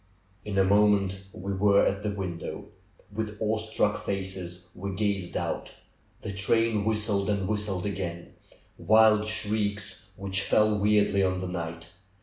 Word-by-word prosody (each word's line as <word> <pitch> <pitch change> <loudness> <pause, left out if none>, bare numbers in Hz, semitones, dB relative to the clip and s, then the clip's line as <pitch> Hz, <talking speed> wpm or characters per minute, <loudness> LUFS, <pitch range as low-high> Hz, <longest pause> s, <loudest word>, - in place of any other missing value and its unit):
In 105 -2 -4
a 95 - +5
moment 100 -1 +3
we 100 +2 -5
were 100 +1 +4
at 100 +1 0
the 105 - -2
window. 95 -5 -5 0.4
With 105 0 -4
awe 110 0 0
struck 110 -1 -1
faces 95 -2 -4
w'e 95 +1 -5
gazed 100 -4 -1
out. - - -4 0.5
The 100 - -5
train 110 +2 +1
whistled, 105 -2 0
and 100 -2 0
whistled 105 -3 -1
again 90 -4 -4 0.2
— - - -33
wild 110 0 +5
shrieks 105 -3 -2
which 100 0 -1
fell 105 0 +3
weirdly 105 -1 +3
on 95 -1 +1
the 95 0 -4
night. 85 -2 -5
100 Hz, 145 wpm, -27 LUFS, 95-105 Hz, 0.5 s, a